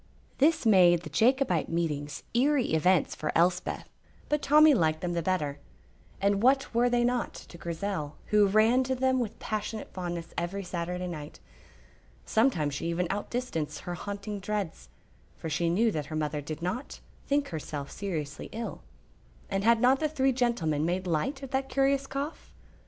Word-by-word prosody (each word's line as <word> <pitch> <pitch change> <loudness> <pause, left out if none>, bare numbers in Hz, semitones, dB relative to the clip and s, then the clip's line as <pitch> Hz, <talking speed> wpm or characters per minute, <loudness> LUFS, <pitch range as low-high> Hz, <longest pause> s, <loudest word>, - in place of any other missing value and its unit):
This 300 -1 +3
made 180 -5 +6
the 155 - -8
Jacobite 230 - +2
meetings 150 -4 -2
eerie 260 - +2
events 175 +2 +3
for 155 - -3
Elspeth, 180 +2 +1 0.4
but 295 0 +1
Tommy 305 +1 +6
liked 160 - +1
them 175 -1 -2
the 170 - 0
better; 155 -5 -1 0.6
and 200 0 +2
what 265 +2 +3
were 240 +1 +3
they 240 0 +2
not 245 0 0
to 170 - -11
Grizel, 170 -3 -3 0.2
who 210 -1 +6
ran 220 +6 +4
to 260 0 0
them 260 0 +2
with 230 -4 -3
passionate 215 0 -4
fondness 175 -2 -5
every 195 +3 -3
Saturday 180 0 -3
night? 155 -4 -7 0.9
Sometimes 175 - +2
she 145 - -3
even 170 +1 0
outdistanced 200 -8 -3
her 175 - -5
haunting 200 +3 -5
dreads, 190 - -4 0.5
for 160 - -5
she 165 +2 +1
knew 220 +7 +3
that 150 -6 -3
her 155 - -5
mother 150 -1 -1
did 155 +3 -6
not 200 +10 -4 0.3
think 285 0 +1
herself 150 -3 -5
seriously 155 -8 -4
ill; 230 +1 -5 0.7
and 195 0 0
had 230 +1 +5
not 260 +2 +5
the 310 - 0
three 270 -3 +2
gentlemen 230 - 0
made 180 +3 -1
light 185 - -1
of 270 - -7
that 265 0 -1
curious 275 0 +2
cough? 280 +3 -5
195 Hz, 165 wpm, -29 LUFS, 165-245 Hz, 0.9 s, made